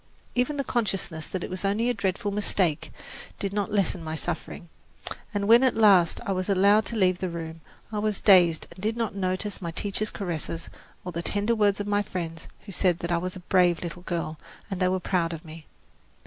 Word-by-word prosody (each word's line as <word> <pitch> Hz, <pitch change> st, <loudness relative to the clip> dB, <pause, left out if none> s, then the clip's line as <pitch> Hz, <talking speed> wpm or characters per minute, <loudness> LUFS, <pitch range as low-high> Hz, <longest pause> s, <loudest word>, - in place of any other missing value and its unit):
Even 250 Hz, +4 st, 0 dB
the 275 Hz, -, 0 dB
consciousness 195 Hz, -, -1 dB
that 185 Hz, -, -4 dB
it -, -, -5 dB
was 185 Hz, +1 st, -2 dB
only 205 Hz, +4 st, +1 dB
a 245 Hz, -, +2 dB
dreadful 200 Hz, -1 st, -1 dB
mistake 195 Hz, -6 st, +1 dB, 0.5 s
did 200 Hz, -1 st, -3 dB
not 205 Hz, +1 st, -1 dB
lessen 190 Hz, -4 st, +1 dB
my 160 Hz, 0 st, -4 dB
suffering, 170 Hz, +1 st, -5 dB, 0.6 s
and 205 Hz, -2 st, -1 dB
when 230 Hz, +2 st, +8 dB
at 260 Hz, -, +3 dB
last 195 Hz, -6 st, +5 dB
I 200 Hz, -, -1 dB
was 185 Hz, +1 st, -1 dB
allowed 200 Hz, +2 st, +5 dB
to 235 Hz, -, -4 dB
leave 185 Hz, -4 st, +3 dB
the 185 Hz, -, -2 dB
room, 165 Hz, -1 st, -6 dB, 0.3 s
I 210 Hz, -, -2 dB
was 210 Hz, -1 st, 0 dB
dazed 175 Hz, -5 st, +5 dB
and 185 Hz, -, -12 dB
did 220 Hz, +3 st, -1 dB
not 230 Hz, -2 st, -1 dB
notice 195 Hz, +1 st, -2 dB
my 170 Hz, -, -3 dB
teacher's 205 Hz, +5 st, -1 dB
caresses, 165 Hz, -3 st, -4 dB, 0.3 s
or 180 Hz, -, -4 dB
the 170 Hz, -, -3 dB
tender 205 Hz, +5 st, 0 dB
words 205 Hz, -3 st, +2 dB
of 205 Hz, -, -2 dB
my 205 Hz, 0 st, +1 dB
friends, 165 Hz, -5 st, -5 dB, 0.2 s
who 200 Hz, -, -8 dB
said 180 Hz, -2 st, +2 dB
I 170 Hz, -, +2 dB
was 180 Hz, +1 st, -4 dB
a 185 Hz, -, -8 dB
brave 180 Hz, -2 st, +3 dB
little 175 Hz, +1 st, -6 dB
girl 165 Hz, -3 st, -3 dB, 0.3 s
and 190 Hz, -, -2 dB
they 185 Hz, -, +3 dB
were 185 Hz, 0 st, +1 dB
proud 175 Hz, -2 st, 0 dB
of 165 Hz, +1 st, -8 dB
me. 160 Hz, 0 st, -11 dB
185 Hz, 210 wpm, -26 LUFS, 170-205 Hz, 0.6 s, when